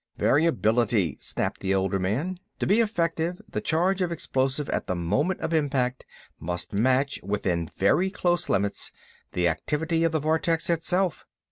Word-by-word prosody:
"Variability," 115 - +2
snapped - - -2
the 95 0 +1
older 95 0 +1
man. 125 - -1 0.2
"To - - -1
be 205 +4 +3
effective, 170 -5 0
the - - -3
charge 180 +4 +1
of 175 -2 0
explosive 135 -3 -1
at - - -2
the 90 - -1
moment 140 - 0
of 165 - -2
impact 135 -5 0 0.3
must 90 +3 -4
match, 130 +6 +2
within 90 -4 -1
very 155 - +2
close 175 -3 0
limits, 100 +1 0 0.4
the 90 -1 +2
activity 160 - 0
of 165 - +2
the 160 - +1
vortex 160 +2 +1
itself. 175 +1 0
145 Hz, 150 wpm, -26 LUFS, 100-170 Hz, 0.4 s, be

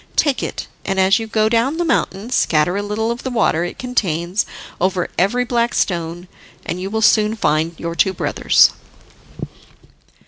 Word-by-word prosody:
Take 290 -4 +2
it, - - -4 0.2
and, 195 -1 -1
as 190 +4 +4
you 225 - -5
go 215 -1 +1
down 235 +7 +1
the 345 - 0
mountain, 230 - -1
scatter 165 -6 +2
a 200 - -1
little 210 +2 -2
of 235 - -5
the 260 - -4
water 215 -9 +1
it 175 - -5
contains 190 -6 -1 0.3
over 185 0 0
every 225 +8 +1
black 240 -1 0
stone 175 0 -2 0.4
and 180 - -4
you 190 - -4
will 220 +1 -1
soon 215 0 +4
find 160 -4 0
your 170 0 -4
two 170 +4 +2
brothers." - - +3
205 Hz, 170 wpm, -19 LUFS, 175-235 Hz, 0.4 s, as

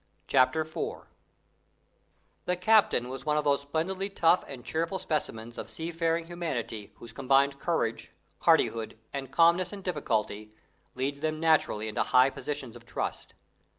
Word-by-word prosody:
CHAPTER 135 +4 +3
IV 155 0 -5 1.4
The 180 - +1
captain 180 - +3
was 130 +1 -6
one 150 -1 +1
of 150 - +1
those 140 -1 +2
splendidly 170 +7 -2
tough 175 -2 +3
and 130 -3 -9
cheerful 165 +4 -1
specimens 120 -9 -3
of - - -6
seafaring 165 0 -1
humanity 135 -11 -4
whose 115 -1 -12
combined 140 +3 +2
courage, 130 -10 -1 0.3
hardihood, 110 -1 +2 0.2
and 135 -2 -4
calmness 170 +5 +4
in 200 -2 -8
difficulty 110 - -2 0.4
leads 135 +2 -2
them 155 0 -2
naturally 155 -9 +2
into 105 - -1
high 125 +2 +4
positions 140 -6 -5
of 120 - -12
trust. 120 - -5
145 Hz, 140 wpm, -29 LUFS, 125-165 Hz, 1.4 s, calmness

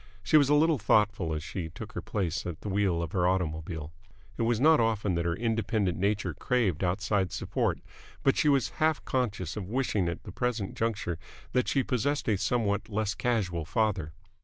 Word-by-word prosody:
She - - +2
was 145 -3 +6
a 150 - +5
little 155 -1 +4
thoughtful 105 -4 +2
as 75 - -4
she 85 0 -5
took 105 +5 -9
her - - -5
place 90 -6 -2
at 85 -3 -6
the 105 - -5
wheel 95 -4 +1
of 80 - -5
her 90 -2 +2
automobile. 80 -3 -2 0.4
It - - -4
was 115 -1 +2
not 155 +4 +6
often 110 -4 +1
that 85 0 -1
her 85 -1 0
independent 110 -3 0
nature 100 +2 0
craved 110 - 0
outside 95 0 0
support, - - -1 0.4
but 135 - +4
she 150 - +3
was 140 -4 +3
half 155 -1 +2
conscious 105 -9 -1
of 100 -3 -5
wishing 110 -7 0
at 85 - -6
the - - -8
present 120 -5 -2
juncture 105 -7 -2 0.3
that 125 -1 +1
she 135 - +2
possessed 140 +3 -1
a 110 - +3
somewhat 110 -2 0
less 105 -1 -1
casual 100 -10 -1
father. 95 -3 0
105 Hz, 190 wpm, -29 LUFS, 90-120 Hz, 0.4 s, was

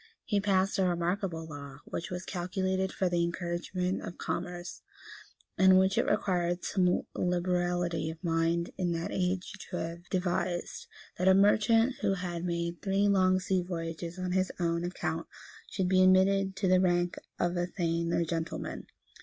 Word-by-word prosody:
He 205 -3 +1
passed 195 -1 +2
a - - +4
remarkable 175 -1 -1
law, 140 -3 -9
which 170 - -5
was 180 0 -5
calculated 190 +1 -1
for 190 - 0
the 175 -1 +1
encouragement 175 +2 -2
of 175 - -7
commerce, 175 0 -4 0.8
and 190 0 +7
which 190 +1 +3
it - - +2
required 175 -2 0
some 180 -2 +2
liberality 175 -2 0
of 160 +3 -9
mind 165 0 +1
in 175 -2 +1
that 165 0 -3
age 185 0 -1 0.2
to 180 - -3
have 170 +1 -6
devised 175 -1 -2 0.3
that 180 - +1
a 190 - +7
merchant, 225 +5 +4
who 195 - +2
had 175 -2 -4
made 170 -1 -2
three 195 +1 +2
long 185 -2 +4
sea 185 0 0
voyages 170 -1 -5
on 185 -1 -3
his 185 +1 +1
own 170 -1 0
account, 165 -2 -3 0.4
should 190 -3 -1
be 185 0 +4
admitted 190 +1 +4
to 200 -1 0
the 185 0 +5
rank 175 -1 +1 0.2
of 175 0 0
a 175 0 0
thane 170 -2 -1
or 170 - +1
gentleman. 165 0 -4
180 Hz, 160 wpm, -30 LUFS, 170-190 Hz, 0.8 s, and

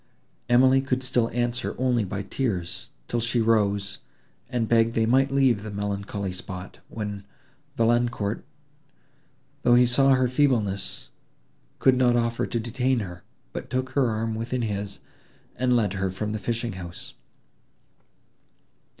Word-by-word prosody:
Emily 130 +2 +5
could 130 -1 -1
still 120 -2 +1
answer 120 +1 -1
only 125 -3 +2
by 100 +1 -4
tears, 95 -5 -3 0.2
till 120 - -1
she 115 +1 0
rose, 100 -3 +1 0.5
and 120 -3 -1
begged 115 0 +3
they 115 - +3
might 135 +4 +3
leave 135 -6 +3
the 110 - -6
melancholy 100 -1 -3
spot, 90 0 -7
when 105 -2 -5 0.5
Valancourt, 115 -2 +1 1.2
though 120 -2 +5
he 125 0 +6
saw 135 +2 +5
her 130 0 +2
feebleness, 120 -8 0 0.7
could 130 - +4
not 125 -1 +4
offer 115 0 0
to 120 - -2
detain 125 +2 0
her, 90 -3 -7 0.3
but - - -6
took 130 0 -2
her 135 -4 +2
arm 110 0 -1
within 120 +2 -2
his, 100 -2 -4 0.5
and 125 0 +2
led 105 -5 +2
her 95 -1 -1
from 105 +3 -3
the 110 - -3
fishing 115 0 -2
house. 90 -2 -8
115 Hz, 140 wpm, -25 LUFS, 100-125 Hz, 1.2 s, he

